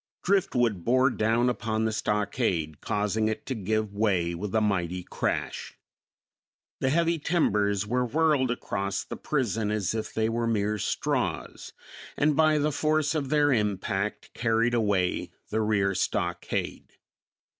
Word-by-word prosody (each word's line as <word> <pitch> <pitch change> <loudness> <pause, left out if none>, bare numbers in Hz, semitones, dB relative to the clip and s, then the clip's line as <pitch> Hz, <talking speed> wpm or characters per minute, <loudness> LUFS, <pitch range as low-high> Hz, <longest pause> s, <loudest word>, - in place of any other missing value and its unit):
Driftwood 125 - +1
bore 130 +4 +3
down 115 +2 +2
upon 110 -2 -1
the 110 - +1
stockade, 105 - -1
causing 105 +1 0
it 110 - -3
to 135 - -2
give 110 -1 -1
way 95 -5 +1
with 95 +4 -4
a - - +5
mighty 90 -4 -1
crash. - - -3 1.0
The 130 - +1
heavy 170 +3 +2
timbers 105 - +1
were 125 +4 0
whirled 145 0 +2
across 100 -5 -2
the - - -7
prison 115 -7 -1
as 105 -2 -1
if 110 -1 -3
they 110 0 0
were 115 +1 -1
mere 105 -1 0
straws, - - -2 0.4
and 150 0 +3
by 155 0 +4
the 150 +1 +1
force 155 +1 +1
of 145 -4 -2
their 145 -1 +3
impact 105 -2 -2
carried 115 0 +1
away 100 -6 +1 0.2
the 110 - 0
rear 100 -2 +1
stockade. 90 -1 -2
110 Hz, 140 wpm, -27 LUFS, 100-130 Hz, 1.0 s, a